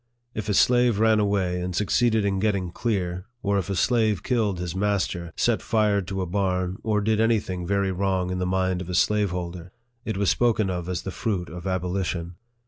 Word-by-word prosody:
If 105 -1 -4
a 105 - +2
slave 120 -1 +4
ran 110 0 +4
away 95 -3 0
and 90 0 -3
succeeded 110 +2 +2
in 95 -1 0
getting 100 -4 0
clear, 90 -5 -2 0.2
or 100 0 +2
if 95 - -5
a 100 - -1
slave 110 -2 +2
killed 110 -7 0
his 90 0 -4
master, 95 -4 -1
set - - +2
fire 105 -2 +2
to 95 0 -3
a - - -2
barn, 90 0 -1
or 105 -1 0
did 110 +1 +1
any 115 0 +3
thing 90 -3 -5
very 100 0 +1
wrong 95 -1 0
in 90 - -2
the 90 - -1
mind 95 -1 0
of 90 - -7
a 90 - -2
slaveholder, 90 -4 0 0.3
it 110 -3 -3
was 100 -1 +2
spoken 110 -5 +2
of 90 -1 -4
as 90 -1 -3
the 95 - -4
fruit 95 -2 -2
of 85 +2 -7
abolition. 90 -2 -2
95 Hz, 205 wpm, -25 LUFS, 90-105 Hz, 0.3 s, slave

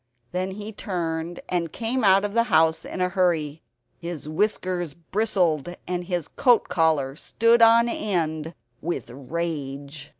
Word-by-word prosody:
Then 185 +1 -2
he 210 +2 -6
turned 170 -4 -3
and 170 -3 -1
came 235 +2 -1
out 195 0 +5
of 205 - -4
the 230 0 +3
house 160 -6 +3
in 185 - -5
a 180 - +2
hurry. 165 -5 0 0.4
His 170 -3 -6
whiskers 175 -2 -1
bristled 175 -3 0
and 180 0 -2
his 175 -3 -2
coat 245 -3 +3
collar 155 -5 +1
stood 230 +8 +2
on 230 +1 +7
end 165 -8 -2 0.3
with 170 -7 -4
rage. 145 0 -5
175 Hz, 140 wpm, -24 LUFS, 160-200 Hz, 0.4 s, on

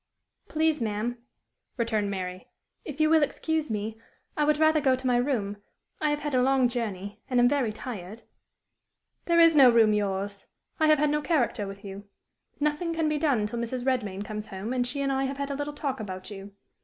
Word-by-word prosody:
"Please, 315 -2 +1
ma'am," 225 +2 -2 0.6
returned 220 -4 0
Mary, 185 -1 -5 0.4
"if 295 -1 -8
you 310 - +4
will 320 0 +5
excuse 315 +1 -1
me, 220 +1 -4 0.3
I 300 - +1
would 300 0 +3
rather 315 0 +4
go 265 -2 +3
to 260 +1 -9
my 250 -1 +3
room. 235 -6 -1 0.4
I 305 - +2
have 295 0 -1
had 295 -1 -3
a 255 - +3
long 265 0 +3
journey, 210 -3 -4
and 250 -1 +2
am 245 - +6
very 255 -4 +1
tired." 215 -2 -8 1.0
"There 340 -1 +3
is 330 -1 +7
no 270 -4 +8
room 225 -2 +5
yours. 200 -1 -2 0.3
I 315 - +4
have 310 0 +6
had 295 +1 +2
no 300 0 +1
character 250 - 0
with 195 +1 -9
you. 200 +1 -8 0.5
Nothing 300 +3 -1
can 320 -1 +1
be 305 -1 0
done 275 -9 +2
til 230 +3 -4
Mrs. 245 +2 -3
Redman 210 -7 -1
comes 210 0 -5
home, 195 +5 -5
and 250 -1 0
she 280 +3 -3
and 275 - 0
I 270 0 0
have 270 +1 -4
had 280 0 -3
a - - -2
little 290 +1 -3
talk 275 -3 -3
about 185 -2 -7
you. 200 0 -9
250 Hz, 205 wpm, -27 LUFS, 210-295 Hz, 1.0 s, no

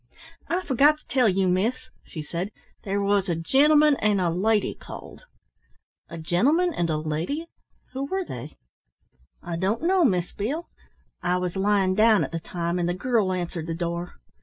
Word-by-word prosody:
"I 360 +2 -1
forgot 285 +3 +4
to 305 - -27
tell 250 -3 +3
you, 190 0 +1
miss," 205 +8 0
she 155 - -7
said, 170 +5 -4 0.3
"there 200 0 -1
was 200 -1 +1
a 170 - +1
gentleman 295 - +4
and 210 -2 +2
a 175 -2 +1
lady 210 +5 +1
called." - - -11 0.8
"A 170 - -7
gentleman 280 - +2
and 170 - -1
a 155 - 0
lady? 160 - -3 0.5
Who 265 +1 -3
were 380 +5 -2
they?" - - -8 0.9
"I 170 -2 -4
don't 200 - -1
know, 365 +1 +3
Miss 180 - +1
Beale. 290 +12 -3 0.5
I 180 +1 +1
was 180 0 -3
lying 195 -1 +2
down 215 +1 +4
at - - -5
the 165 - -3
time, 170 +1 -3
and 175 0 0
the 175 - -1
girl 215 -2 +1
answered 175 -2 -3
the 165 - -3
door. 170 +1 -4
195 Hz, 175 wpm, -25 LUFS, 175-260 Hz, 0.9 s, forgot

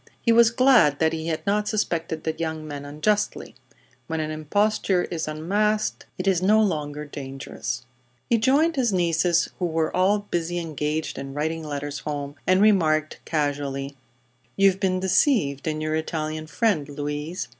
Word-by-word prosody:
He 230 - +2
was 230 0 +6
glad 235 - +5
that 160 +1 +2
he 160 0 -4
had 160 +2 -3
not 210 +1 +1
suspected 170 -7 -1
the 160 - -1
young 160 -1 -4
man 145 -1 -6
unjustly. 205 +9 -1 0.5
When 160 -1 -2
an 155 0 -2
imposture 190 +4 +1
is 160 -3 -3
unmasked 205 +8 -1
it 185 - -3
is 185 -3 +3
no 210 +4 +4
longer 150 -7 -1
dangerous. 135 -3 -6 0.4
He 235 - +2
joined 290 +7 +3
his 245 -4 +2
nieces, 170 -1 +2
who 180 - 0
were 160 -1 -1
all 190 +3 +3
busily 175 0 -1
engaged 155 -2 -3
in 135 0 -7
writing 160 +2 -2
letters 145 -1 -4
home, 145 -1 -4
and 185 +2 +4
remarked, 155 -7 +3
casually: 140 -2 -2 0.6
"You've 195 -1 +4
been 185 -2 +1
deceived 185 - +2
in 155 0 -1
your 155 0 -1
Italian 155 0 -3
friend, 165 -7 0
Louise. 150 +4 -4
160 Hz, 155 wpm, -24 LUFS, 150-195 Hz, 0.6 s, was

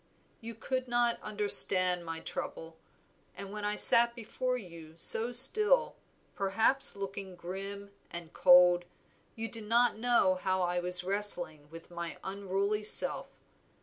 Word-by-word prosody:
You 230 -1 -12
could 255 +3 -7
not 240 -1 -3
understand 185 -4 +2
my 165 -1 -9
trouble, 165 0 -10 0.6
and 195 +1 -11
when 210 0 -10
I 210 0 -4
sat 235 +2 +5
before 250 +2 -6
you 165 -7 -15
so 225 +7 +3
still, 425 - +4 0.4
perhaps 220 +8 +2
looking 195 -1 -10
grim 195 +3 -10 0.2
and 170 -1 -12
cold, 180 0 +2 0.5
you 225 0 -8
did 225 -1 -9
not 235 0 -1
know 235 -5 0
how 185 -1 -3
I 175 0 -4
was 180 0 +5
wrestling 180 -6 -2
with 165 +2 -16
my 170 -1 -9
unruly 200 +2 -5
self. 210 - +1
200 Hz, 135 wpm, -27 LUFS, 180-230 Hz, 0.6 s, sat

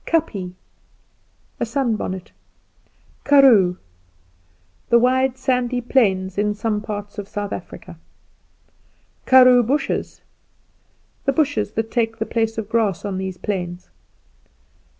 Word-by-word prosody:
Kapje 205 - -1 1.1
A - - 0
sun 240 -1 0
bonnet. 185 -3 -5 0.9
Karoo 240 -11 +5 1.1
The 235 - +6
wide 260 +2 +2
sandy 250 -1 0
plains 195 -7 +1
in 210 0 0
some 210 0 -2
parts 205 0 -6
of 200 - -6
South 205 0 -4
Africa. - - -9 1.3
Karoo 255 -1 +7
bushes 270 +6 -2 1.0
The 275 - +2
bushes 285 -8 0
that 225 0 -3
take 225 -2 -1
the 220 - -2
place 225 -1 -1
of 220 -2 -4
grass 215 -4 0
on 195 -2 -3
these 190 -1 -5
plains. 180 -3 -5
225 Hz, 110 wpm, -21 LUFS, 200-255 Hz, 1.3 s, Karoo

